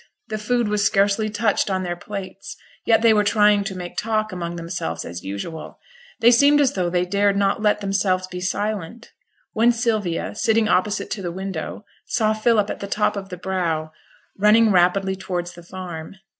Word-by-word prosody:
The 215 0 -3
food 240 +2 0
was 210 0 0
scarcely 205 +1 +2
touched 210 -1 0
on 190 -1 -1
their 175 -1 -3
plates, 195 +1 -8 0.3
yet 225 0 +4
they 230 -1 +6
were 210 -1 +3
trying 210 -1 +4
to 195 -1 -4
make 175 -1 -7
talk 215 -1 -1
among 175 -2 -4
themselves 165 - -4
as 85 +1 -7
usual; 100 - -6 0.4
they 235 +1 +7
seemed 285 +4 +5
as 280 -3 +3
though 180 -2 -1
they 180 0 +1
dared 200 +1 +1
not 200 +2 +1
let 210 -1 +2
themselves 195 -2 0
be 180 -1 -7
silent, 210 +3 -3 0.4
when 230 +2 +4
Sylvia, 220 -7 -1
sitting 220 +1 +2
opposite 200 +2 0
to 200 - -3
the 175 -2 -3
window, 190 +2 -5 0.2
saw 215 -3 +1
Philip 215 -1 +2
at - - -6
the 200 - -5
top 210 +1 0
of 195 -1 -6
the 180 - -7
brow, 170 -4 -2 0.4
running 210 +2 +5
rapidly 190 +1 +3
towards 180 -2 -4
the 175 - -12
farm. 175 -1 -8
200 Hz, 185 wpm, -22 LUFS, 180-215 Hz, 0.4 s, they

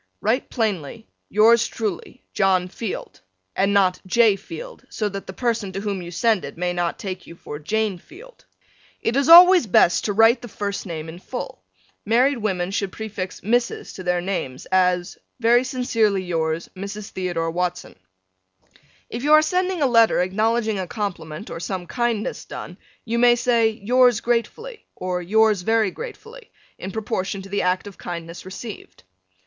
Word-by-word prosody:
Write 235 +5 0
plainly 220 - -3 0.2
Yours 225 +2 +5
truly, 220 +3 -5
John 190 -3 +2
Field 210 +1 -6 0.3
and 195 +1 +2
not 190 -2 +2
J. 220 +1 +4
Field, 480 - -9
so 215 - -2
that 195 -1 -6
the - - -5
person 230 -2 -2
to 195 - -4
whom 200 -2 -3
you 175 - -7
send 210 +4 +1
it - - -8
may 180 0 -1
not 175 -1 -1
take 185 -2 -6
you 170 - -11
for 150 -3 -8
Jane 205 +4 -1
Field. 475 - -16 0.5
It 230 - -1
is 280 +3 +2
always 355 -4 +9
best 175 -2 +4
to 205 - 0
write 225 +4 +5
the 240 - -8
first 200 -2 -4
name 160 -2 -5
in 165 +2 -9
full. 250 +6 -7 0.4
Married 245 +5 +2
women 190 -4 -1
should 200 -1 -2
prefix 200 -4 -6
Mrs. 235 +4 -1
to - - -8
their 180 -1 0
names, 175 -9 -4
as 180 -1 +1 0.2
Very 240 +1 +4
sincerely 230 -7 0
yours, 165 -2 -2
Mrs. 200 +2 -7
Theodore 175 -3 -2
Watson. 180 +1 -3 1.1
If 235 - -6
you 295 +3 +3
are 310 0 +7
sending 365 0 0
a - - +4
letter 230 -3 +4
acknowledging 215 +3 0
a 185 - -3
compliment 190 -4 -5
or - - -5
some 180 0 -4
kindness 235 0 -2
done - - -8 0.3
you 235 0 -1
may 240 0 +6
say, 235 -2 +2
Yours 245 +4 +3
gratefully, 335 - -3
or 180 -1 -3
Yours 215 +2 +3
very 220 0 +2
gratefully, 475 - -10 0.3
in 190 - -5
proportion 195 -2 -3
to 195 - -11
the 200 +1 -1
act 180 +2 0
of 200 -2 -11
kindness 170 0 -7
received. 195 - -9
205 Hz, 165 wpm, -22 LUFS, 180-235 Hz, 1.1 s, always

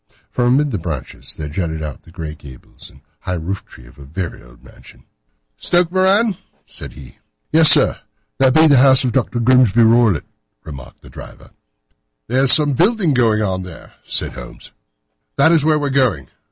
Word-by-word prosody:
From 120 -1 0
amid 145 0 0
the 105 - -3
branches 75 -6 -7
there 75 - -7
jutted 80 0 -4
out 75 -2 -7
the 80 +2 -19
grey 80 -3 -7
gables 70 -4 -14
and 70 - -21 0.2
high 90 - -4
roof 90 +4 -5
tree 60 - -17
of - - -19
a - - -11
very 85 +5 -7
old - - -20
mansion. - - -18 0.5
"Stoke 175 -1 0
Moran?" 190 +2 +2 0.3
said - - -11
he. 65 -4 -15 0.3
"Yes, 160 0 +5
sir, - - +3 0.4
that 130 -1 +3
be 160 0 +6
the 145 -4 +5
house 130 0 +5
of 125 - -1
Dr. 120 0 -2
Grimesby 120 -2 +3
Roylott," 115 -7 +3 0.4
remarked 70 -6 -12
the - - -14
driver. - - -13 0.7
"There 130 +3 0
is 135 - +4
some 145 -2 +3
building 185 - +1
going 110 -4 +1
on 95 -2 -2
there," 90 -4 -12
said - - -2
Holmes; - - -12 0.7
"that 140 +4 +4
is 160 -4 +2
where 155 0 +2
we 145 -1 -2
are - - -5
going." 120 - 0
115 Hz, 185 wpm, -17 LUFS, -, 0.7 s, be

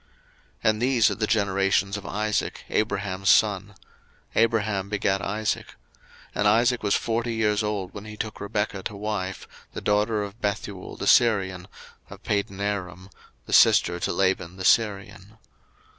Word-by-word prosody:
01:025:019 - - -35 0.6
And 110 +1 -6
these 125 -3 +3
are - - 0
the 110 -1 -2
generations 100 -2 +1
of 105 - -7
Isaac, 105 +1 -2
Abraham's 100 -3 -1
son: 100 -1 +3 0.6
Abraham 110 -4 +1
begat 100 -1 0
Isaac: 105 +2 -2
01:025:020 - - -16 0.6
And 105 - +1
Isaac 120 +3 +3
was 100 - +1
forty 115 0 -1
years 105 -1 +1
old 105 -3 -3
when 100 +1 -8
he 105 0 -9
took 110 0 -5
Rebekah 105 0 -2
to 105 - -5
wife, 100 -2 -4 0.3
the - - -6
daughter 105 +1 +1
of 100 +3 -9
Bethuel 100 -2 -4
the - - -4
Syrian 95 -6 +3 0.4
of - - -12
Padanaram, 100 -2 -3 0.3
the - - -6
sister 90 0 +5
to - - -1
Laban 95 -2 0
the 95 - -5
Syrian. 100 -1 0
105 Hz, 150 wpm, -25 LUFS, 95-110 Hz, 0.6 s, sister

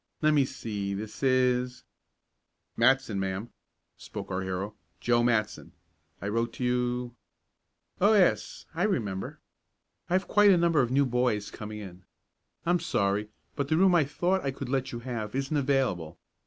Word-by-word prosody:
Let 155 0 +5
me 145 -3 +4
see, 100 -5 -4
this 110 +1 -7
is 125 -1 +2 0.5
" - - -52
"Matson, 120 -3 +3
ma'am," 95 +4 -3 0.5
spoke - - -8
our 95 0 -1
hero. 95 +2 -3 0.3
"Joe 120 -1 +2
Matson. 110 -7 0 0.5
I 100 - -5
wrote 115 +2 -1
to - - -5
you 125 0 0 0.4
" - - -38
"Oh, 210 +3 +6
yes, 110 - +2
I 165 - -3
remember. 110 - -1 0.7
I - - -1
have 185 0 +2
quite 210 -1 +5
a 190 - +6
number 170 -3 +3
of 120 - 0
new 140 +2 +3
boys 120 -5 0
coming 105 0 -7
in. 95 -3 -10 0.6
I'm 175 +1 +3
sorry, 105 -9 0 0.3
but 140 -1 -1
the 155 - +2
room 190 +1 +5
I 170 -3 +5
thought 175 +7 0
I 140 - 0
could 135 -1 -6
let 135 -1 -1
you 120 - -6
have 115 -3 -4
isn't 135 +3 -1
available. 130 - 0
125 Hz, 170 wpm, -28 LUFS, 105-140 Hz, 0.7 s, Oh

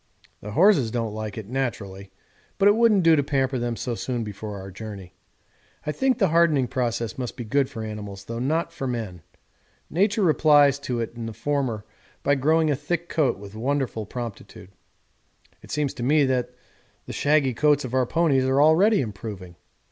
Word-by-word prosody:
The 105 0 -7
horses 165 - +4
don't 115 -2 -2
like 110 -1 -5
it, 110 - -5
naturally, 100 -7 -4 0.5
but 195 - +4
it 205 - +6
wouldn't 220 -5 +4
do 165 -1 +6
to 145 - +3
pamper 135 -2 0
them 120 0 -2
so 120 +1 -3
soon 120 0 -3
before 105 0 -7
our 95 0 -9
journey. 95 -3 -9 0.7
I 150 - -1
think 265 - +1
the 195 -7 +2
hardening 155 -5 +3
process 120 0 -2
must 125 -2 -5
be 120 - -4
good 135 +4 +1
for 110 - -6
animals 105 -2 -7
though 115 0 -5
not 160 +6 -1
for 135 - -4
men; 110 -8 -4 0.7
nature 200 +4 +2
replies 145 -4 +5
to 125 -4 -3
it 115 0 -4
in 115 -1 -6
the 115 - -6
former 130 -6 -2 0.4
by 140 - +3
growing 155 +3 +2
a - - +2
thick 170 +5 -3
coat 150 -5 +1
with 100 0 -11
wonderful 120 -2 -2
promptitude. 115 -5 -8 0.9
It - - -15
seems 150 -2 -1
to - - -8
me 145 +4 +3
that 125 -2 0 0.6
the - - -7
shaggy 145 -3 +2
coats 145 +2 +2
of 125 - -7
our 130 -1 +2
ponies 150 -5 +2
are 130 +1 +2
already 175 +9 +5
improving. 100 -5 -7
130 Hz, 185 wpm, -24 LUFS, 110-150 Hz, 0.9 s, it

